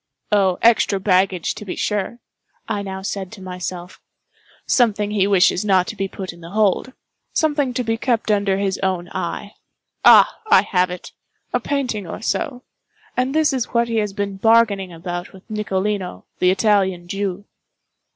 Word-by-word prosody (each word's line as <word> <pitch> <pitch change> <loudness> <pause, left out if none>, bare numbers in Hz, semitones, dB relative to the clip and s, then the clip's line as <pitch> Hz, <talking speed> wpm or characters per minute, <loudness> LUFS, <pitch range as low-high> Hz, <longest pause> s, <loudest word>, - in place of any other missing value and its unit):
"Oh, 195 -3 +3
extra 225 -3 +4
baggage, 185 -2 +1
to - - -9
be 190 - -5
sure," 210 +2 -2 0.5
I 205 -1 -2
now 190 -1 -6
said 195 -2 -4
to 205 - -11
myself—"something 185 +4 -3
he 200 -2 +2
wishes 190 -1 +3
not 190 -3 +3
to - - -6
be 195 -1 -2
put 190 -1 -7
in 170 - -16
the 165 - -10
hold—something 255 - -1
to 250 - 0
be 225 -1 -1
kept 230 -2 0
under 200 -2 +2
his 195 -1 -1
own 185 -2 -1
eye—ah, - - +2
I 455 - +7
have 180 -2 +1
it—a 180 0 -7
painting 250 -9 -2
or - - -6
so—and 270 - -4
this 310 -2 +3
is 255 -2 -3
what 235 0 +2
he 230 - -1
has 210 -2 0
been 200 -1 -3
bargaining 215 -3 +3
about 175 +1 -6
with 190 0 -16
Nicolino, 200 - -2
the 180 - +4
Italian 190 -3 +2
Jew." 195 +1 -3
200 Hz, 150 wpm, -21 LUFS, 185-225 Hz, 0.5 s, I